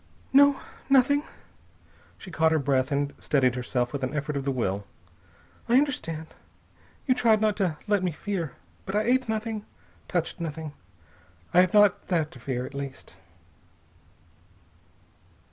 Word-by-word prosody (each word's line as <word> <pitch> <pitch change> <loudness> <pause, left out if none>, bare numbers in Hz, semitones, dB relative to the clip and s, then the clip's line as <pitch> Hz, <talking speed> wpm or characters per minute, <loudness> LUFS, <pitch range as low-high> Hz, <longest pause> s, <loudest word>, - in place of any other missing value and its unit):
"No. 285 0 +6 0.3
Nothing." 275 +2 +5 1.0
She 190 - -11
caught 160 -1 +3
her 160 - +3
breath 135 -1 +1
and 145 0 0
steadied 130 -4 +2
herself 125 0 -2
with 140 -2 -3
an 130 +3 -2
effort 150 0 -2
of 140 -1 -3
the 140 - +1
will. 100 -6 -1 0.9
"I 240 - +6
understand. 165 - -1 0.7
You 255 - +4
tried 230 -3 +3
not 215 -1 +2
to 180 -7 0
let 205 -2 +2
me 185 - +1
fear. 170 -3 -4 0.3
But 195 - -3
I 210 - +2
ate 250 +1 +1
nothing, 220 -1 -2 0.4
touched - - -2
nothing. 160 -2 -5 0.8
I 180 - +7
have 185 +2 +1
not 205 -2 +4
that 165 -5 0
to 125 - -13
fear, 125 0 -3
at - - -9
least." 140 -9 -7
160 Hz, 145 wpm, -26 LUFS, 140-215 Hz, 1.0 s, I